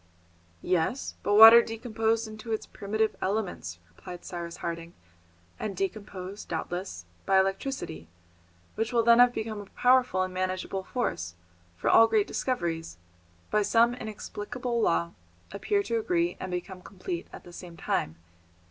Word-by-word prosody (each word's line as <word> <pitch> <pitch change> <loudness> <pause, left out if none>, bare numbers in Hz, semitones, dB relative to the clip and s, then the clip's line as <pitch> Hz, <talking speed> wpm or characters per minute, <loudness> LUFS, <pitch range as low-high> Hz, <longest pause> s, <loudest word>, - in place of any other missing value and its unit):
"Yes, 185 +9 0
but 205 - +1
water 225 +2 +11
decomposed 225 -1 -1
into 215 +1 -8
its 220 - -2
primitive 215 +2 -2
elements," 185 - -2
replied 175 - -11
Cyrus 170 -1 -6
Harding, 170 0 -5 0.6
"and 200 -4 -4
decomposed, 195 0 -5
doubtless; 170 - -4 0.2
by 195 0 +5
electricity, 190 - -2 0.7
which 225 +2 -2
will 235 -2 +3
then 235 +1 +6
have 245 0 +7
become 220 -3 -4
a - - -10
powerful 250 -7 +3
and 185 0 -5
manageable 185 +1 -2
force, 90 - -3 0.4
for - - -3
all 225 - +7
great 415 - +2
discoveries, 165 - -3 0.5
by 210 - +3
some 230 +3 +4
inexplicable 235 +1 -4
law, 85 - +1 0.4
appear 405 - 0
to 230 -10 -1
agree 175 -4 0
and 185 - -5
become 180 +1 -5
complete 180 -3 -6
at - - -11
the 175 - -13
same 170 -1 -10
time. 80 - -1
200 Hz, 140 wpm, -28 LUFS, 175-225 Hz, 0.7 s, water